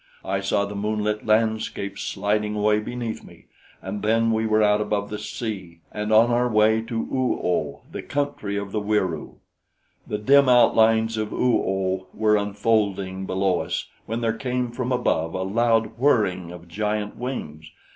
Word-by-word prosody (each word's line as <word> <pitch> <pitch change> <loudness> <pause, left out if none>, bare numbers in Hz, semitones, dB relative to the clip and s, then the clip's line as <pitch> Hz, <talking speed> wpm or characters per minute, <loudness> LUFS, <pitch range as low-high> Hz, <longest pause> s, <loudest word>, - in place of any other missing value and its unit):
I 95 - -1
saw 95 +1 0
the 100 - -7
moonlit 105 +1 -2
landscape 110 -2 0
sliding 105 +1 -1
away 105 0 +2
beneath 115 +1 -5
me, - - -16 0.4
and 100 +2 -5
then 115 +1 +2
we 110 0 +1
were 110 0 +3
out 105 0 +3
above 105 -1 -2
the 105 - -4
sea 95 -8 -6
and 105 0 -3
on 115 +2 +5
our 125 +1 +2
way 110 0 +3
to 115 +1 -7
Oo 130 +2 -1
oh, 75 -5 -1
the - - -5
country 140 -8 -3
of 100 -1 -4
the 105 - -1
Wieroo. 105 -2 -1 0.7
"The 105 - -2
dim 135 +5 +5
outlines 115 -2 +4
of 110 -1 -2
Oo 125 -1 +2
oh 95 0 -1
were 110 -1 +3
unfolding 100 -2 0
below 95 -1 +1
us - - -3 0.2
when 115 +2 -3
there 115 -1 +1
came 125 +1 -2
from 125 +1 -3
above 90 -9 0
a 95 - -1
loud 115 +3 +1
whirring 100 -10 +2
of 90 -1 -11
giant 105 +3 -2
wings. 80 - -6
105 Hz, 165 wpm, -24 LUFS, 100-115 Hz, 0.7 s, on